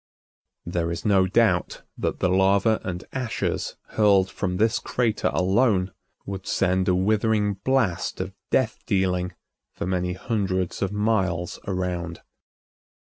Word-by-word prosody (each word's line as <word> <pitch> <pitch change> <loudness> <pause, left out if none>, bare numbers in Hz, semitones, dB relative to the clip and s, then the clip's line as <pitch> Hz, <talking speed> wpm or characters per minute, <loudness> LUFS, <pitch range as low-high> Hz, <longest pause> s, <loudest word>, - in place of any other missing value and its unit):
There 85 -1 -1
is 85 0 -5
no 95 -3 +4
doubt 100 -3 +1
that - - -3
the - - +3
lava 100 +4 +3
and 90 -1 -4
ashes 130 -4 -2
hurled 100 -3 +3
from 90 -2 -2
this 110 +3 +2
crater 115 -4 0
alone 95 0 +2 0.3
would 95 -1 -6
send 95 -1 +1
a 90 - +3
withering 105 +1 +1
blast 130 -10 0
of - - -4 0.2
death - - +1
dealing 90 -2 0 0.4
for - - -4
many 90 -1 -1
hundreds 95 -3 -2
of 100 -1 0
miles 95 -5 0
around. 90 -3 -3
95 Hz, 130 wpm, -25 LUFS, 90-105 Hz, 0.4 s, no